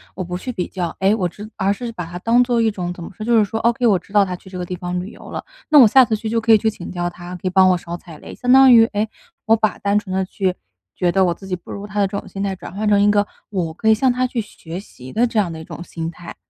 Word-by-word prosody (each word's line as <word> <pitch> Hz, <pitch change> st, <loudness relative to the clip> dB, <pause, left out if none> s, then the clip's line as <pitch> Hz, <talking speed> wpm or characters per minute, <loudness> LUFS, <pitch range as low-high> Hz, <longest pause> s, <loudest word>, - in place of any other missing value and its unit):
我 185 Hz, -, -3 dB
不 180 Hz, +1 st, -4 dB
去 250 Hz, -, -5 dB
比 185 Hz, -7 st, -3 dB
较， 175 Hz, -3 st, -4 dB
诶， 195 Hz, +2 st, +3 dB
我 190 Hz, -5 st, 0 dB
直” 210 Hz, +5 st, -10 dB
而 195 Hz, +1 st, +1 dB
是 240 Hz, +2 st, -6 dB
把 180 Hz, -6 st, -6 dB
它 175 Hz, +2 st, -7 dB
当 235 Hz, +4 st, +4 dB
作 240 Hz, -2 st, +1 dB
一 225 Hz, -, +3 dB
种 180 Hz, -3 st, -4 dB
怎 175 Hz, -, -9 dB
么 -, -, -7 dB
说， 215 Hz, -, -5 dB
就 235 Hz, 0 st, +3 dB
是 215 Hz, -, +5 dB
说 220 Hz, +2 st, -3 dB
：“ok， 235 Hz, +1 st, +2 dB
我 200 Hz, -4 st, +4 dB
知 180 Hz, -, -15 dB
道 205 Hz, -1 st, +6 dB
他 180 Hz, -2 st, -3 dB
去 185 Hz, -, -16 dB
这 185 Hz, -1 st, -7 dB
个 180 Hz, -, -3 dB
地 180 Hz, -, -5 dB
方 180 Hz, 0 st, -3 dB
旅 185 Hz, +4 st, -6 dB
游 -, -, -13 dB
了， -, -, -5 dB, 0.3 s
那 300 Hz, -, +7 dB
我 240 Hz, -, +9 dB
下 260 Hz, +4 st, +6 dB
次 220 Hz, -, 0 dB
去 220 Hz, +1 st, -4 dB
就 230 Hz, +1 st, +1 dB
可 225 Hz, 0 st, +2 dB
以 220 Hz, -, +8 dB
去 220 Hz, -, +1 dB
请 185 Hz, -, -8 dB
教 175 Hz, -1 st, -2 dB
他， 175 Hz, +1 st, -10 dB
可 180 Hz, -, -11 dB
以 -, -, +2 dB
帮 190 Hz, 0 st, +5 dB
我 180 Hz, -, +3 dB
少 170 Hz, 0 st, -7 dB
踩 165 Hz, -3 st, -13 dB
雷。” -, -, -10 dB
相 250 Hz, -, +3 dB
当 265 Hz, 0 st, +8 dB
于， 225 Hz, -1 st, +8 dB
诶， 210 Hz, +1 st, 0 dB, 0.4 s
我 225 Hz, -, +5 dB
把 215 Hz, -1 st, 0 dB
单 200 Hz, +1 st, +1 dB
纯 190 Hz, -3 st, -3 dB
地 190 Hz, -, +1 dB
去 185 Hz, 0 st, -1 dB, 0.4 s
觉 175 Hz, -1 st, +1 dB
得 190 Hz, 0 st, +3 dB
我 175 Hz, -, +1 dB
自 195 Hz, -, -13 dB
己 185 Hz, -, -1 dB
不 175 Hz, -, -12 dB
如 205 Hz, +1 st, -6 dB
他 205 Hz, 0 st, -4 dB
的 200 Hz, -, +4 dB
这 195 Hz, -, -7 dB
种 -, -, -12 dB
心 195 Hz, +1 st, -5 dB
态， 195 Hz, -1 st, -1 dB
转 185 Hz, -, -10 dB
换 210 Hz, +1 st, -2 dB
成 205 Hz, -1 st, +4 dB
一 205 Hz, -, +4 dB
个 205 Hz, 0 st, +3 dB, 0.2 s
我 175 Hz, -6 st, -2 dB
可 220 Hz, +6 st, 0 dB
以 -, -, +7 dB
向 255 Hz, +2 st, +2 dB
他 255 Hz, +1 st, 0 dB
去 245 Hz, -1 st, -3 dB
学 175 Hz, -5 st, -7 dB
习 130 Hz, -10 st, -12 dB
的 235 Hz, +3 st, +2 dB
这 230 Hz, -2 st, 0 dB
样 185 Hz, -5 st, 0 dB
的 160 Hz, -, -7 dB
一 -, -, -8 dB
种 170 Hz, -, -8 dB
心 165 Hz, -1 st, -5 dB
态。 170 Hz, 0 st, -11 dB
200 Hz, 360 characters per minute, -20 LUFS, 180-220 Hz, 0.4 s, 我